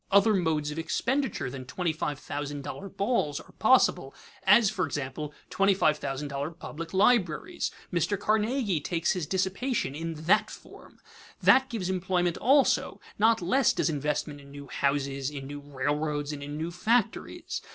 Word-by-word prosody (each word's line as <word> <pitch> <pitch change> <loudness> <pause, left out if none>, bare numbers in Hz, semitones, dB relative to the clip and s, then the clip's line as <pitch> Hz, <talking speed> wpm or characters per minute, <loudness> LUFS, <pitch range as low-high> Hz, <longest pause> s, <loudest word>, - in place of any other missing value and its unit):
Other 200 +2 +5
modes 160 -5 0
of 155 - -5
expenditure 260 - -1
than 130 -1 -7
twenty 170 +5 -2
five 150 -2 -3
thousand 145 0 -5
dollar 195 +7 -6
balls 195 - 0
are - - -14
possible, 215 - +3 0.3
as, 205 +3 +6
for - - -1
example, 145 +1 -4 0.2
twenty 195 0 +3
five 155 -5 +2
thousand 140 +1 -4
dollar 140 +2 -3
public 165 -1 -8
libraries. 190 - +2 0.2
Mr. 185 +4 0
Carnegie 215 - +1
takes 165 +3 0
his 175 -5 -2
dissipation 195 - -1
in 165 +2 -4
that 165 - +3
form. - - -13 0.5
That 265 0 +6
gives 220 -7 -3
employment 180 -2 0
also; 270 +3 +3 0.2
not 225 -2 +4
less 255 +8 +3
does - - 0
investment 145 0 -2
in 140 - -15
new 140 0 -9
houses, 140 0 -1
in 140 -2 -7
new 145 +1 -7
railroads, 145 +1 -2
and 145 - -7
in 145 +1 -6
new 165 +2 -3
factories. 220 +6 -1
165 Hz, 160 wpm, -28 LUFS, 145-200 Hz, 0.5 s, as